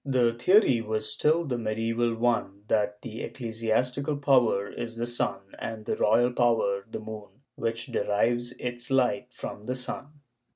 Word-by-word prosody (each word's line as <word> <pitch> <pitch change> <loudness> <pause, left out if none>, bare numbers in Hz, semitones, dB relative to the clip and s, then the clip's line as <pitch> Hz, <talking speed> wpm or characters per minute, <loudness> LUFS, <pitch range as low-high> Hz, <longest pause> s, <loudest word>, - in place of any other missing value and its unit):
The 125 -4 +2
theory 125 - +4
w^as 110 -1 -2
still 155 +10 +2
the 125 -5 -2
medieval 115 +1 0
one 115 -4 0
— - - -30
that 105 -1 +1
the 115 -1 -6
ecclesiastical 125 +5 -1
power 125 -8 +3
is 115 +1 -6
the 120 - -1
sun 110 -5 -1 0.2
and 110 -1 -5
the - - 0
royal 120 +3 +3
power 110 -5 +2
the - - -5
moon, 110 +4 -10
which 115 0 -2
derives 120 +4 0
its 120 -1 -4
light 125 -4 +2
from 105 -3 -7
the 125 - -2
sun. 145 +3 -6
115 Hz, 160 wpm, -28 LUFS, 110-125 Hz, 0.2 s, theory